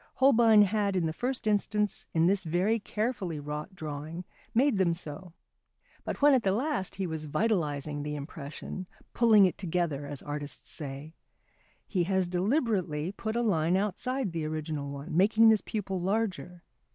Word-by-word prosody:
Holbein 230 -5 +6
had 200 -1 0
in 180 -3 +1
the 160 - -1
first 250 +5 -3
instance 210 -1 0
in 160 0 +3
this 190 +2 +2
very 185 +7 +1
carefully 205 -6 -2
wrought 150 +6 -6
drawing 155 +1 -6 0.3
made 240 -1 +3
them 170 -3 +3
so, 160 +1 -9 0.7
but - - -4
when 290 -1 +7
at 260 - +4
the 190 -3 +1
last 250 - -1
he 195 - -2
was 160 -3 -4
vitalising 150 -5 -1
the 150 +1 -4
impression, 150 +5 -7 0.3
"pulling 220 -4 +6
it 180 - -1
together" 165 -6 -1
as 145 -2 -6
artists 145 0 -4
say, 145 +1 -6 0.7
he 180 -4 0
has 190 0 +1
deliberately 185 - 0
put 220 +2 -4
a 240 - +1
line 175 -4 +2
outside 215 +3 -1
the 165 -1 -3
original 155 -2 -3
one, 140 +2 -6
making 215 +5 +6
this 220 -2 +4
pupil 195 -4 -3
larger. 185 -3 -2
185 Hz, 160 wpm, -29 LUFS, 155-215 Hz, 0.7 s, when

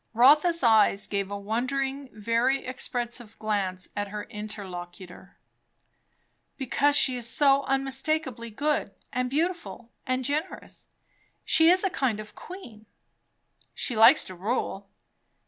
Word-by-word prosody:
Rotha's 300 +7 +5
eyes 215 -3 +4
gave 200 -1 -2
a 200 - -4
wondering, 265 +6 -2
very 230 +5 0
expressive, 240 -3 -4
glance 195 -4 -2
at 205 0 -2
her 210 +1 -6
interlocutor. 190 -3 -9 1.2
"Because 285 +2 +1
she 260 -3 +3
is 235 -1 -3
so 275 +1 +3
unspeakably 270 -2 -1
good, 295 +7 -1 0.2
and 250 0 -1
beautiful, 315 -5 -3 0.2
and 255 0 -1
generous. 305 +7 -4 0.6
She 320 0 +5
is 365 +2 +4
a 390 - +1
kind 245 -9 -1
of 215 0 -9
a - - -34
queen!" 240 - -11 0.9
"She 245 - -2
likes 230 +7 +6
to 185 - -9
rule." 195 0 -3
240 Hz, 125 wpm, -27 LUFS, 210-275 Hz, 1.2 s, likes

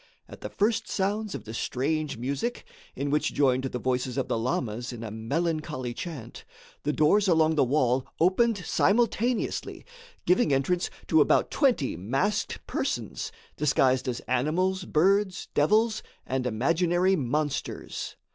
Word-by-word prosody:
At - - -12
the - - -5
first 215 +2 0
sounds 205 +2 -1
of - - -6
the 110 - -8
strange 150 +6 -1
music, 140 - -3 0.3
in 140 +2 -2
which 150 - 0
joined 130 -2 +2
the 125 - -3
voices 125 +1 -1
of 135 - 0
the - - +1
lamas 120 0 -2
in 120 -2 -7
a 110 - -5
melancholy 130 +1 -2
chant, 130 -7 -7 0.4
the 150 - 0
doors 195 +8 +3
along 160 -2 +4
the 150 - +3
wall 130 -1 +1
opened 200 +6 +3
simultaneously, 235 +4 0 0.4
giving 180 -4 +3
entrance 155 +7 +1 0.2
to - - +4
about - - +3
twenty 245 - +2
masked 135 - -1
persons, - - -3 0.2
disguised 130 -3 +2
as 125 -1 -2
animals, 180 +9 0
birds, 190 +4 +1
devils 215 +9 +3 0.2
and 130 -1 -1
imaginary 170 - +2
monsters. 145 0 -3
150 Hz, 135 wpm, -27 LUFS, 130-185 Hz, 0.4 s, along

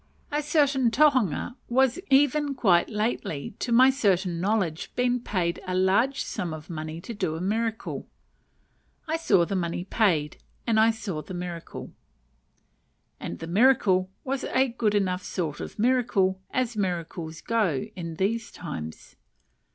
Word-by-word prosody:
A 295 +1 0
certain 285 -4 +2
tohunga 250 - +2 0.2
has 265 +3 +4
even 285 +1 +3
quite 185 -9 +3
lately, 210 -9 -2
to 245 - -3
my 255 +3 +7
certain 190 -9 +1
knowledge, 185 -5 0
been 250 0 +1
paid 180 -7 -2
a 185 - -1
large 200 +9 +2
sum 170 -3 -4
of 155 +3 -10
money 155 0 -5
to 230 - -7
do 185 -7 -2
a - - -4
miracle! 220 +4 -2 1.0
I 320 +1 0
saw 195 - +3
the 195 - -3
money 175 -1 -2
paid, 180 -7 +1 0.3
and 225 -2 +3
I 220 +1 +6
saw 210 -8 -3
the 185 - -8
miracle. 175 -1 -6 1.3
And 85 - -5
the - - -7
miracle 185 -1 +3
was 270 0 -2
a 265 0 +2
good 225 -3 0
enough 185 -2 +1
sort 160 -6 -3
of - - -7
miracle, 215 -6 +2
as 250 -2 -1
miracles 170 -4 -3
go 205 -12 0
in 165 -3 -5
these 215 +6 -1
times. 80 - -7
200 Hz, 145 wpm, -26 LUFS, 175-245 Hz, 1.3 s, my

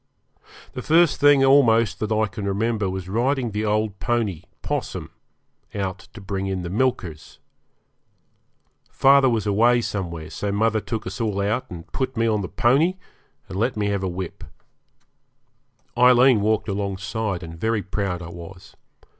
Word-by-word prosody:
The 125 - -5
first 165 +3 +3
thing 145 -2 +6
almost 115 -7 +4
that 110 0 -3
I 110 0 +2
can 105 0 -7
remember 105 0 0
was 95 -1 -5
riding 120 +4 0
the 105 +1 -2
old 105 -2 -1
pony, 105 -5 -1 0.2
'Possum, - - -4 0.6
out 95 -1 -3 0.2
to - - -8
bring 95 0 -4
in 95 -2 -3
the 85 - -5
milkers. 95 - -2 1.5
Father 135 0 +5
was 115 -3 0
away 115 +4 +3
somewhere, 85 -8 -4
so 100 +5 -3
mother 110 +1 +1
took 110 -1 -4
us 95 +5 -5
all 105 -3 -1
out 110 +6 -1
and 85 -2 -9
put 130 -2 -3
me 115 - +2
on 110 -2 +1
the 90 - -5
pony, 145 +10 +2 0.5
and 95 +1 -5
let 115 +1 0
me 105 -1 0
have 100 -1 -1
a 95 - -2
whip. 90 -1 -6 1.5
Aileen 125 -1 +5
walked 110 +1 +1
alongside, 100 0 -3
and 80 0 -9
very 110 -2 0
proud 95 -2 -3
I 85 - -8
was. 90 +3 -11
105 Hz, 155 wpm, -23 LUFS, 95-120 Hz, 1.5 s, thing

